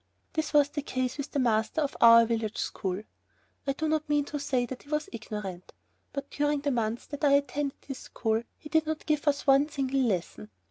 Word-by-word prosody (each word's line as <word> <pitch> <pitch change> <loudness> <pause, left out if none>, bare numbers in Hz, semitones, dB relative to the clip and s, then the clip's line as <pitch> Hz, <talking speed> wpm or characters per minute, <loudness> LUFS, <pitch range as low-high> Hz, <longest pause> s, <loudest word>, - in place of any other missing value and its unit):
This 315 -1 -1
was 290 -1 +5
the 290 - -3
case 255 0 -2
with 285 - -3
the - - -3
master 230 +2 +1
of 290 -2 -1
our 230 0 +9
village 225 -2 -2
school. 190 +1 -3 0.6
I 275 - +2
do 315 +3 -2
not 310 -1 0
mean 295 -1 +2
to 295 0 -4
say 260 -3 0
that 250 +1 -7
he 285 - -18
was 300 0 -1
ignorant, 210 -5 -6 0.4
but 280 -1 -6
during 290 0 0
the 285 0 0
month 230 -1 -2
that 290 +1 -7
I 285 -1 +5
attended 280 0 0
his 270 -2 -6
school, 225 -1 -1 0.2
he - - -11
did 315 0 +2
not 315 0 -3
give 305 -1 0
us 285 -1 +2
one 275 +2 +5
single 275 -2 0
lesson. 180 - -1
275 Hz, 215 wpm, -29 LUFS, 230-295 Hz, 0.6 s, our